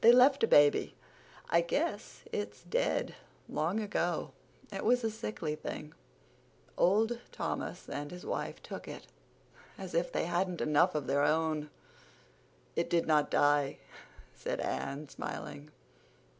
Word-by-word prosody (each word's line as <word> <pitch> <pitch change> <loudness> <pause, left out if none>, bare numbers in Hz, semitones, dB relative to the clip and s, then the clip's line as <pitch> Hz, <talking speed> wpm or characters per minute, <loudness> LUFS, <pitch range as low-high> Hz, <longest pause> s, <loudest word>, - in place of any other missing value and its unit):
They 235 - +9
left 255 +2 +6
a - - +6
baby. 145 -5 +5 0.6
I 170 - +6
guess 295 - -2
it's 440 -2 -4
dead - - 0 0.3
long 170 +8 0
ago. 210 -2 -1 0.4
It - - -3
was 245 +2 +3
a 225 - +1
sickly 215 -8 -3
thing. 150 0 -6 0.8
Old 220 +6 +3
Thomas - - -4
and 145 0 -4
his 180 +2 -9
wife - - -3
took - - -7
it—as 190 -3 -12
if 170 +1 +1
they - - 0
hadn't 175 +1 0
enough 155 +3 +3
of 150 -3 -1
their 140 +3 +2
own." 155 0 +1 1.1
"It 170 - 0
didn't 155 -3 +3
die," 145 -1 +3 0.6
said - - -3
Anne, 140 - -3
smiling. 140 +1 -6
170 Hz, 130 wpm, -32 LUFS, 150-220 Hz, 1.1 s, They